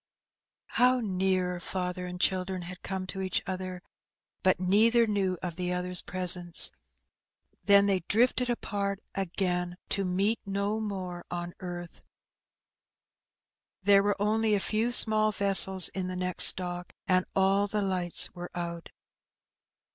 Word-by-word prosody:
How 250 Hz, +1 st, +4 dB
near 185 Hz, -4 st, -1 dB
father 180 Hz, 0 st, -5 dB
and 180 Hz, 0 st, -8 dB
children 185 Hz, 0 st, -1 dB
had 180 Hz, +1 st, -10 dB
come 190 Hz, 0 st, -5 dB
to 190 Hz, +1 st, -6 dB
each 190 Hz, -1 st, -2 dB
other! 185 Hz, -1 st, -6 dB, 0.6 s
but 185 Hz, -1 st, +2 dB
neither 220 Hz, +6 st, +3 dB
knew 195 Hz, -4 st, -2 dB
of 175 Hz, -2 st, -5 dB
the 180 Hz, -1 st, -3 dB
other^s 180 Hz, 0 st, -1 dB
presence: 180 Hz, -2 st, +6 dB, 0.9 s
then 200 Hz, 0 st, +5 dB
they 195 Hz, -2 st, +1 dB
drifted 245 Hz, +3 st, +1 dB
apart, 200 Hz, -4 st, -3 dB
again, 180 Hz, -2 st, -3 dB
to 200 Hz, -, 0 dB
meet 195 Hz, +5 st, 0 dB
no 200 Hz, +2 st, -3 dB
more 185 Hz, -5 st, -6 dB
on 175 Hz, 0 st, -6 dB
earth. 175 Hz, -2 st, -9 dB, 1.8 s
There 200 Hz, 0 st, +5 dB
were 205 Hz, 0 st, -1 dB
only 215 Hz, +1 st, +1 dB
a -, -, 0 dB
few 220 Hz, +4 st, -1 dB
small 215 Hz, -2 st, +4 dB
vessels 195 Hz, -2 st, +4 dB
in 185 Hz, -1 st, -5 dB
the 185 Hz, -, -5 dB
next 180 Hz, 0 st, +4 dB
dock, 180 Hz, -1 st, -7 dB
and 185 Hz, -1 st, +2 dB
all 195 Hz, +1 st, +2 dB
the 210 Hz, 0 st, -2 dB
lights 180 Hz, -3 st, 0 dB
were 175 Hz, -1 st, -8 dB
out. 170 Hz, -1 st, -6 dB
190 Hz, 135 wpm, -28 LUFS, 180-200 Hz, 1.8 s, presence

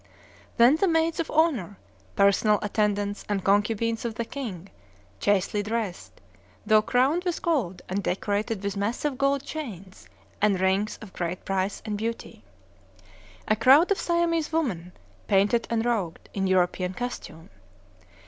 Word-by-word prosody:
Then 245 Hz, +5 st, +6 dB
the 390 Hz, -, +2 dB
maids 325 Hz, -1 st, +1 dB
of 330 Hz, -, -2 dB
honor, 255 Hz, -, +1 dB, 0.4 s
personal 200 Hz, +2 st, +4 dB
attendants, 205 Hz, -1 st, -1 dB
and 200 Hz, -2 st, -1 dB
concubines 220 Hz, +3 st, +1 dB
of 230 Hz, -2 st, -3 dB
the 235 Hz, -, -3 dB
king, 200 Hz, -9 st, -7 dB, 0.5 s
chastely 205 Hz, +1 st, +1 dB
dressed, 210 Hz, -3 st, -4 dB, 0.5 s
though 215 Hz, -1 st, +5 dB
crowned 265 Hz, +10 st, +1 dB
with 355 Hz, -3 st, -3 dB
gold, 255 Hz, -, -1 dB
and 190 Hz, +2 st, -2 dB
decorated 205 Hz, +3 st, -2 dB
with 200 Hz, 0 st, -2 dB
massive 230 Hz, +8 st, -1 dB
gold 275 Hz, +1 st, +1 dB
chains 205 Hz, -, -8 dB, 0.3 s
and 200 Hz, -3 st, +3 dB
rings 190 Hz, +3 st, +1 dB
of 200 Hz, -, -12 dB
great 175 Hz, +1 st, -4 dB
price 195 Hz, +1 st, -2 dB
and 210 Hz, -2 st, -3 dB
beauty. 230 Hz, +1 st, -5 dB, 1.0 s
A 215 Hz, -, +3 dB
crowd 270 Hz, -, +5 dB
of 400 Hz, -, +2 dB
Siamese 335 Hz, -2 st, 0 dB
women, 210 Hz, -, -2 dB, 0.4 s
painted 205 Hz, +4 st, +2 dB
and 230 Hz, 0 st, 0 dB
rouged, 205 Hz, -9 st, -2 dB
in 195 Hz, -1 st, -1 dB
European 185 Hz, 0 st, +1 dB
costume. 210 Hz, -9 st, -6 dB
215 Hz, 140 wpm, -26 LUFS, 195-260 Hz, 1.0 s, Then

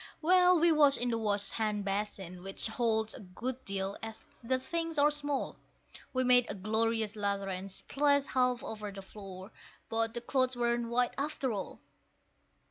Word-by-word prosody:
Well, 360 Hz, +1 st, +5 dB
we 340 Hz, +1 st, +5 dB
washed 295 Hz, -3 st, +5 dB
in 245 Hz, 0 st, -1 dB
the 230 Hz, -, 0 dB
wash 205 Hz, -2 st, +2 dB
hand 210 Hz, -2 st, -1 dB
basin, 195 Hz, -3 st, -3 dB
which 195 Hz, +1 st, 0 dB
holds 220 Hz, -1 st, 0 dB
a -, -, -9 dB
good 240 Hz, +6 st, -6 dB
deal, 195 Hz, 0 st, -2 dB
as 225 Hz, 0 st, -6 dB, 0.2 s
the 260 Hz, +3 st, +1 dB
things 330 Hz, +4 st, -3 dB
are 290 Hz, +1 st, +5 dB
small; 290 Hz, -1 st, -2 dB, 0.5 s
We 255 Hz, 0 st, +1 dB
made 250 Hz, -1 st, +5 dB
a 205 Hz, -, -3 dB
glorious 220 Hz, +2 st, 0 dB
lather, 200 Hz, -1 st, -1 dB
and 190 Hz, +1 st, -5 dB
splashed 285 Hz, +6 st, +1 dB
half 250 Hz, -1 st, +1 dB
over 210 Hz, -2 st, -5 dB
the 195 Hz, 0 st, -9 dB
floor; 190 Hz, 0 st, -10 dB, 0.4 s
but 225 Hz, 0 st, 0 dB
the 240 Hz, -, -3 dB
clothes 255 Hz, +1 st, +1 dB
weren't 235 Hz, -1 st, 0 dB
white 245 Hz, +1 st, +1 dB
after 280 Hz, -4 st, -1 dB
all. 195 Hz, -2 st, -6 dB
230 Hz, 170 wpm, -32 LUFS, 205-260 Hz, 0.5 s, Well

